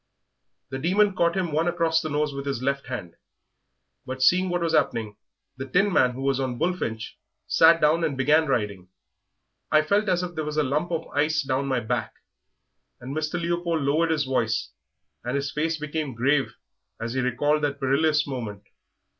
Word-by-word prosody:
The 135 - -3
Demon 200 +7 +3
caught 170 0 +1
him 180 -4 -1
one 160 +3 +1
across 165 -2 +1
the 155 - -4
nose 150 0 -1
with 140 0 -6
his 135 -3 -2
left 140 +1 -1
hand, 100 -10 -6 0.9
but 130 0 -4
seeing 185 +6 +4
what 175 0 -1
was 165 -1 0
'appening, 110 -8 0 0.4
the 135 +1 -5
Tinman, 180 -5 +3
who 130 +2 -6
was 135 -1 +1
on 130 -2 -2
Bullfinch, 120 -10 -3 0.3
sat 165 +1 +5
down 160 +2 +3
and 145 -5 -1
began 150 +4 +3
riding. 100 -8 -2 0.8
I 155 0 +5
felt 200 +5 +1
as 180 -1 +1
if 175 -1 -5
there 155 - -3
was 150 0 -4
a 155 - +3
lump 150 +6 -1
of 165 -1 -2
ice 155 +1 +1
down 135 +1 -1
my 130 -2 0
back," 120 +2 -3 0.8
and 130 +3 -7
Mr. 155 +3 -2
Leopold 170 -2 -1
lowered 155 +4 +2
his 155 -3 +1
voice, 115 -4 -1 0.5
and 125 +3 -2
his 140 0 -2
face 160 +2 -1
became 150 -3 -4
grave 135 0 +1 0.4
as 115 +1 -4
he 130 - 0
recalled 145 +5 +1
that 140 -1 -1
perilous 150 +3 +2
moment. 115 -7 -6
145 Hz, 180 wpm, -25 LUFS, 130-165 Hz, 0.9 s, sat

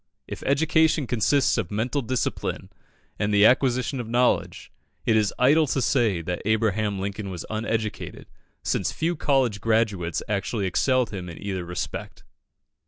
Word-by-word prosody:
If - - -7
education 155 +1 +3
consists 125 +4 +2
of 85 - -3
mental 120 +7 -1
discipline 125 0 -3 0.5
and 105 - 0
the 105 0 +5
acquisition 130 +1 +2
of 115 -2 -5
knowledge, 120 +1 0 0.3
it 110 - +3
is 105 -2 +2
idle 145 +5 +4
to 135 - 0
say 115 - +1
that 90 +1 -3
Abraham 110 -1 +1
Lincoln 100 +1 -4
was 90 -3 -6
uneducated, 110 0 -3 0.4
since - - 0
few 170 +2 -1
college 130 -9 +1
graduates 105 -7 0
actually 105 0 -1
excelled 130 +7 +1
him 90 -4 -6
in 85 - -9
either 95 -3 -4
respect. 90 +1 -6
110 Hz, 145 wpm, -25 LUFS, 100-130 Hz, 0.5 s, the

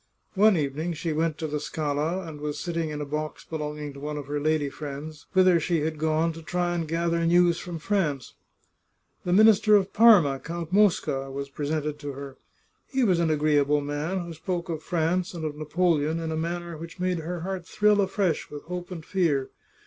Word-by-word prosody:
One 205 -1 +5
evening 155 +3 -2
she 165 0 -3
went 160 0 0
to 160 - -4
the 150 0 -2
Scala, 155 +5 -2
and 155 -3 -8
was 150 -1 -3
sitting 165 -2 -2
in 150 -1 -4
a - - -3
box 150 +1 -4
belonging 150 -2 -5
to 140 - -10
one 150 +1 -4
of 145 - -5
her 145 +1 -2
lady 155 0 +1
friends, 145 +1 -7
whither 185 -2 +5
she 165 0 0
had 155 0 -2
gone 160 +1 +1
to 165 - -9
try 175 +2 -1
and 165 -2 -2
gather 170 +1 0
news 175 0 +4
from 175 -2 -6
France. 155 -7 -1 0.9
The 175 - 0
Minister 215 +1 +6
of 195 -2 +2
Parma, 190 - +6
Count 170 +2 -6
Mosca, 170 -9 +2
was 140 +1 -5
presented 150 +1 -3
to 145 -2 -5
her. 135 0 -8 0.5
He 265 -2 0
was 185 -7 +3
an 170 -1 +2
agreeable 150 -1 +2
man, 150 +6 -2
who 170 - -7
spoke 175 +2 -4
of 160 -2 -3
France 175 +2 -1
and 160 -2 -4
of 150 -1 -3
Napoleon 155 0 +1
in 165 -1 -3
a - - -1
manner 170 +1 -3
which 165 +3 -9
made 180 -1 0
her 170 +2 -4
heart 185 -1 -4
thrill 210 -1 +3
afresh 190 -3 0
with 145 -1 -8
hope 180 0 -6
and 165 -4 -7
fear. 165 -8 0
160 Hz, 200 wpm, -26 LUFS, 150-175 Hz, 0.9 s, Minister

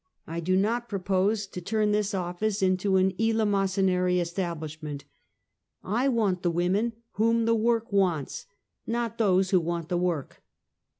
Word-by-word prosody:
I 165 +1 -5
do 185 +3 +1
not 235 +5 0
propose 200 +2 0
to 190 -2 -8
turn 215 +3 0
this 210 -1 0
office 190 +3 -2
into 185 +1 +2
an 190 0 +3
eelemosynary 195 -5 +2
establishment. 160 -4 -4 0.8
I 235 +7 0
want 210 -7 +1
the 175 - +1
women 185 +7 0 0.2
whom 230 +1 +2
the 230 - +3
work 230 +1 +1
wants, 180 -8 0 0.4
not 230 -1 -2
those 190 -3 +3
who 185 - +5
want 170 0 -3
the 175 -1 0
work. 175 -6 -2
190 Hz, 140 wpm, -27 LUFS, 180-215 Hz, 0.8 s, who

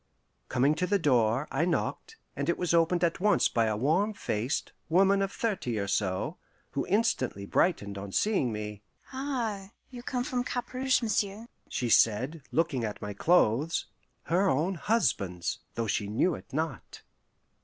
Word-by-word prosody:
Coming 135 +4 +3
to 180 - +2
the 200 - +3
door, 125 - +2
I - - +1
knocked, 310 - -2 0.2
and - - -2
it 170 - +1
was 180 -1 0
opened 170 +1 +3
at 170 -1 +1
once 205 0 +4
by 115 -1 +1
a 110 -1 0
warm 165 - +2
faced, 115 - -2 0.2
woman 195 +4 +4
of 195 0 -1
thirty 190 - -2
or 100 -1 -2
so, 95 -2 -1 0.3
who - - -2
instantly 195 - 0
brightened 100 - +1
on 100 0 -7
seeing 195 - +1
me. 105 -1 -5 0.3
"Ah, 240 -8 -3 0.2
you 245 -2 -8
come 245 0 -2
from 250 -1 -1
Cap 250 0 -4
Rouge, 255 -1 +2
m'sieu'," 210 0 -1 0.2
she 125 -3 -2
said, 130 +11 +3
looking 155 -6 +1
at 105 -2 -3
my 105 0 -5
clothes 155 - +2 0.4
her 185 +4 +2
own 165 +7 +1
husband's, 115 - 0 0.2
though 115 - -1
she 105 -1 -1
knew 115 - +1
it - - -9
not. 155 -1 -4
165 Hz, 165 wpm, -29 LUFS, -, 0.4 s, once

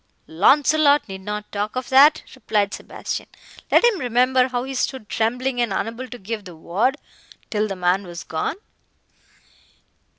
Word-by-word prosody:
"Launcelot 285 - +4
need 190 -1 -8
not 210 +1 -6
talk 205 +2 -3
of 255 -1 -4
that," 285 +4 +6
replied 210 -6 -1
Sebastian, - - -6 0.4
"let - - +5
him 470 -6 +3
remember 250 0 +2
how 250 -1 -2
he 270 +1 -6
stood 260 -3 -2
trembling, 245 +4 -1
and 235 -4 0
unable 230 +6 -3
to 245 - -9
give 215 +1 -5
the 180 -2 -10
word, 200 - 0 0.5
till 215 0 0
the 195 - -4
man 180 +2 0
was 170 -1 -8
gone. 160 - -3
230 Hz, 155 wpm, -22 LUFS, 200-260 Hz, 0.5 s, that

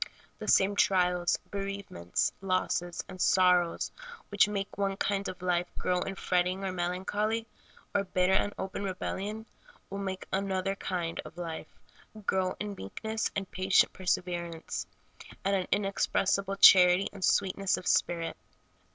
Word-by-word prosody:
The - - -6
same 195 +1 +4
trials, 180 -3 +3
bereavements, 195 - -2
losses, 185 -2 -1
and 185 -1 -8
sorrows 180 -2 +3 0.4
which 205 0 +4
make 200 -1 -3
one 195 -1 -1
kind 200 0 -1
of 180 0 -9
life 180 -1 +1
grow 180 0 0
in 195 +2 -3
fretting 185 +1 0
or 190 - -1
melancholy, 190 +5 -1 0.5
or 200 - +2
bitter 185 0 +2
and 205 +1 +2
open 190 +1 -4
rebellion, 200 +3 -4 0.5
will 195 - -4
make 190 -1 -4
another 195 0 0
kind 175 -4 -3
of - - -12
life 165 -2 -6 0.5
grow 185 -1 0
in 210 0 -3
meekness 220 - -3
and 195 -1 -3
patient 185 +1 +3
perseverance, 175 -2 -2 0.6
and 195 0 +3
an 185 -2 -1
inexpressible 195 0 +1
charity 180 -1 +8
and 195 -2 -8
sweetness 195 0 +2
of - - -8
spirit. 170 -2 +1
190 Hz, 135 wpm, -30 LUFS, 180-195 Hz, 0.6 s, charity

